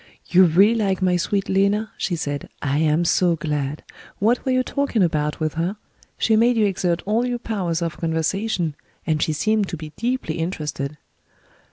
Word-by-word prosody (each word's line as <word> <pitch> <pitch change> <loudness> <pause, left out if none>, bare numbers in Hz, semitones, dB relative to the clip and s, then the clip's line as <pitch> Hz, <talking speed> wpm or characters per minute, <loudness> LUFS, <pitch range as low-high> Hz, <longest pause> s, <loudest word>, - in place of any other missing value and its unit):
"You 185 +1 +5
really 190 +7 +5
like 200 -5 0
my 180 -1 +3
sweet 195 +3 0
Lena?" 200 +3 +1
she 180 - -2
said. 145 -3 -4
"I 145 +1 0
am 160 +2 +2
so 175 0 +3
glad. 150 -2 -3 0.3
What 230 +4 +2
were 265 - 0
you 255 0 +2
talking 280 -7 0
about, 150 -3 0
with 155 -1 -1
her? 175 +5 -2 0.4
She 220 - +2
made 235 +2 +4
you 215 - +4
exert 180 -3 0
all 215 +4 +1
your 245 -1 -1
powers 180 -8 -2
of 165 -2 -3
conversation, 165 +1 -1 0.3
and 155 -2 0
she - - +1
seemed 210 +6 +1
to 170 - -4
be 155 0 -8
deeply 235 -9 -2
interested." 150 -4 -3
180 Hz, 180 wpm, -22 LUFS, 155-215 Hz, 0.4 s, You